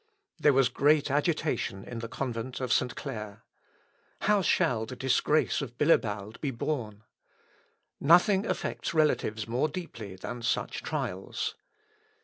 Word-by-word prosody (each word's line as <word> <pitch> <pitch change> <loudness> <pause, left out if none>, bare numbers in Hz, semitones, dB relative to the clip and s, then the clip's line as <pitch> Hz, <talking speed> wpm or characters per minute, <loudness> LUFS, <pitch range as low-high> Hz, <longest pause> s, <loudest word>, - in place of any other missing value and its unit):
There 150 - +5
was 135 -2 +4
great 145 0 +3
agitation 150 - 0
in 120 - -6
the 115 - -5
Convent 125 0 -4
of 130 -1 0
St. 125 -1 +1
Clair. 110 -6 -6 0.8
How 210 -1 +3
shall 125 -12 +2
the 130 - -7
disgrace 135 +5 +2
of 120 -3 -7
Bilibald 110 -8 +1
be 145 - 0
borne? 115 -5 -3 1.0
Nothing 190 +7 +5
affects - - -3
relatives 115 -8 +1
more 125 +6 +1
deeply 120 - -7
than 120 +6 -6
such 115 - -1
trials. - - -3
130 Hz, 130 wpm, -29 LUFS, 115-155 Hz, 1.0 s, There